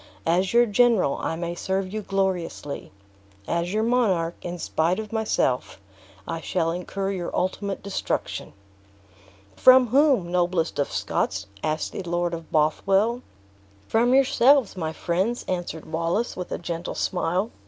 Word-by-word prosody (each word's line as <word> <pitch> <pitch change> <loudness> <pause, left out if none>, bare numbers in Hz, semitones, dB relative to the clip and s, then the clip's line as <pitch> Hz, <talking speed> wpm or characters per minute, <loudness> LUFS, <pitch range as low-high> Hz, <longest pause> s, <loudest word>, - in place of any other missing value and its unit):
As 180 +3 +2
your 240 +1 +5
general, 225 - +3
I - - -2
may 170 +1 -3
serve 190 +2 -2
you 215 - -2
gloriously; 190 -7 -2 0.6
as 170 +1 -1
your 215 +2 +1
monarch, 205 -9 +1
in 175 0 -5
spite 170 +1 0
of 220 0 -6
myself, 210 - 0 0.5
I 165 - -4
should 165 -2 0
incur 195 +3 -3
your 180 -3 -3
ultimate 195 +2 -2
destruction." 200 -1 -3 1.0
"From 255 -1 +7
whom, 260 - +3
noblest 175 -3 0
of 140 - 0
Scots!" - - -1 0.2
asked 155 0 -2
the - - -5
Lord 175 -1 -1
of 165 -1 -7
Bothwell. 195 +9 +2 0.7
"From 240 +3 +3
yourselves, 270 -3 +4
my 160 -4 -3
friends," 185 +9 -1
answered 175 -3 -3
Wallace, 170 +8 -1
with 180 - -6
a - - -1
gentle 170 0 -5
smile. 185 +4 -1
185 Hz, 140 wpm, -25 LUFS, 170-220 Hz, 1.0 s, From